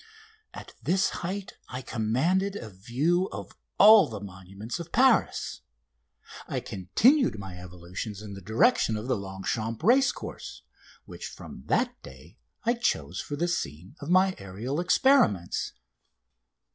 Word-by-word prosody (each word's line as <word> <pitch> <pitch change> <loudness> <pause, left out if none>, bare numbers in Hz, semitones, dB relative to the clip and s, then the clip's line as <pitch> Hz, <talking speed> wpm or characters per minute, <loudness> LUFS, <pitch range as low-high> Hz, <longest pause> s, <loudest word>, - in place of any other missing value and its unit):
At - - -11
this 190 +2 +2
height 190 +3 -5
I 130 0 -6
commanded 155 - 0
a 110 - -7
view 140 - 0
of - - -8 0.2
all 215 0 +8
the 110 -3 -6
monuments 100 - -8
of 170 0 -8
Paris. 255 -2 +2 0.9
I - - -2
continued 235 - +2
my 95 -3 -8
evolutions 90 +3 -7
in 105 -2 -8
the 100 - -9
direction 110 - +2
of 110 +3 -6
the 130 - +1
Longchamps 100 +3 -4
racecourse, 265 +4 +1 0.4
which - - -8
from - - -11
that - - 0
day - - -14 0.2
I 235 0 +2
chose 90 - -1
for 145 - -5
the 170 +4 0
scene 90 - -4
of 145 - -7
my 185 +1 +4
aerial 105 - -4
experiments. 180 - +2
120 Hz, 135 wpm, -27 LUFS, -, 0.9 s, all